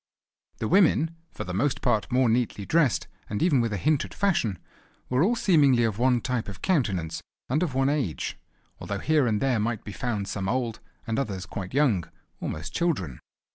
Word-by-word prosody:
The 110 - -2
women, 165 - +3
for - - -6
the 90 - -5
most 130 +8 0
part 110 +2 +1
more 125 0 +3
neatly 115 -3 0
dressed, 150 -4 +2 0.2
and 105 - -1
even 150 -8 +4
with 115 -1 -1
a 105 - -1
hint 150 - +2
at - - -10
fashion, 155 - +1 0.5
were 165 - +3
seemingly 145 - +4
all - - +3
of 105 0 -7
one 125 -1 +3
type 120 -3 -2
of 95 - -9
countenance 100 - 0 0.3
and 145 +6 +1
of 160 -8 -1
one 135 0 +2
age; 140 - -1 0.4
although 100 - -4
here 150 +3 +2
and 105 -2 +1
there 130 -3 +1
might 110 0 -1
be 105 - -7
found 100 +1 -3
some 95 -1 -3
old, 120 -2 -1 0.3
and 115 +1 -1
others 100 -8 -3
quite 95 +3 -6
young, 120 - +2 0.3
almost 75 0 -4
children. 115 - -1
120 Hz, 190 wpm, -26 LUFS, 105-145 Hz, 0.5 s, even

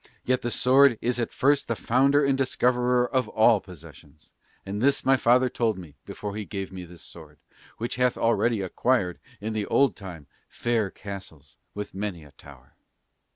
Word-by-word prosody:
Yet 130 0 +1
the 120 - -2
sword 130 0 +4
is 120 +1 -1
at 115 - -2
first 140 +1 +2
the 115 - -1
founder 140 +6 +2
and 140 -1 +2
discoverer 125 -1 +1
of 130 -1 0
all 110 0 +4
possessions; 80 -4 -15 0.3
and 100 +2 -4
this 140 +2 +2
my 135 - +5
father 125 +1 +3
told 115 -4 -1
me 85 -6 -11
before 105 -1 -6
he 110 - -4
gave 95 -2 -6
me 90 -1 -8
this 85 -1 -11
sword, 75 -3 -12 0.4
which 120 +1 -4
hath 125 -1 +2
already 115 -1 +1
acquired 95 -1 0 0.2
in 110 +2 -4
the 105 -2 -2
old 140 -1 +3
time 90 -7 -9 0.2
fair 115 -4 -1
castles 80 -9 -10 0.2
with 105 0 -6
many 95 -4 -4
a 75 - -16
tower." 70 -1 -17
110 Hz, 175 wpm, -26 LUFS, 90-125 Hz, 0.4 s, my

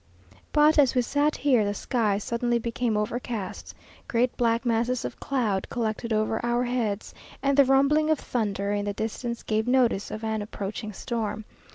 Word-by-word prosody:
But, 300 +1 +5
as 270 -3 +4
we 250 - +3
sat 290 +4 +1
here, 255 -6 +3
the 205 0 -1
sky 215 -3 0
suddenly 235 +3 0
became 230 -1 -1
overcast; 215 -2 -4 0.3
great 240 +1 +1
black 230 +1 +1
masses 235 +1 0
of - - -6
cloud 225 -8 -1
collected 230 0 -2
over 215 +1 0
our 240 +1 +1
heads, 235 -5 -2 0.3
and 275 0 +3
the 280 0 +6
rumbling 280 +4 +3
of 315 - +3
thunder 200 -4 -2
in 205 0 -1
the 205 - -2
distance 230 +3 -4
gave 220 +1 0
notice 245 -5 +2
of 215 - -6
an 220 -1 -1
approaching 205 +1 -5
storm. 215 0 -4
235 Hz, 170 wpm, -26 LUFS, 215-250 Hz, 0.3 s, the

